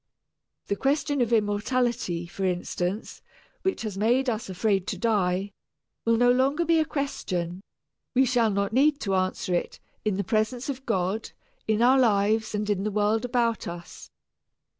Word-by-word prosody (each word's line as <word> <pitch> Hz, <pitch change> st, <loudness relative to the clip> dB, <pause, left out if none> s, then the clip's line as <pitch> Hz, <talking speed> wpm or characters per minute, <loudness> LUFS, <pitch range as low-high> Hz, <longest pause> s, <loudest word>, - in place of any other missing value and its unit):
The 200 Hz, -, -1 dB
question 285 Hz, +3 st, 0 dB
of 240 Hz, -1 st, +1 dB
immortality, 215 Hz, -3 st, 0 dB
for 185 Hz, +3 st, -6 dB
instance, 180 Hz, +2 st, -2 dB, 0.4 s
which 380 Hz, -8 st, -1 dB
has 205 Hz, -3 st, -4 dB
made 245 Hz, +4 st, +2 dB
us 225 Hz, -2 st, -4 dB
afraid 195 Hz, 0 st, 0 dB
to 195 Hz, -, -2 dB
die, 200 Hz, -2 st, 0 dB, 0.5 s
will 230 Hz, 0 st, +3 dB
no 245 Hz, +1 st, +5 dB
longer 275 Hz, +6 st, +2 dB
be 330 Hz, 0 st, +4 dB
a 315 Hz, -, +2 dB
question 185 Hz, -, -3 dB, 0.5 s
we 265 Hz, +1 st, +5 dB
shall 240 Hz, -3 st, +2 dB
not 200 Hz, +1 st, -1 dB
need 290 Hz, +3 st, +3 dB
to 195 Hz, -, -1 dB
answer 185 Hz, -1 st, 0 dB
it, 175 Hz, -, -2 dB, 0.2 s
in 210 Hz, -3 st, 0 dB
the 200 Hz, -, 0 dB
presence 225 Hz, +7 st, -1 dB
of 265 Hz, -1 st, -5 dB
God, 195 Hz, 0 st, -1 dB, 0.4 s
in 220 Hz, +1 st, +2 dB
our 260 Hz, +2 st, +6 dB
lives 215 Hz, -1 st, +2 dB
and 210 Hz, 0 st, -2 dB
in 200 Hz, -2 st, 0 dB
the 215 Hz, -, 0 dB
world 210 Hz, +3 st, +1 dB
about 235 Hz, -3 st, 0 dB
us. 170 Hz, 0 st, -9 dB
215 Hz, 160 wpm, -26 LUFS, 195-245 Hz, 0.5 s, our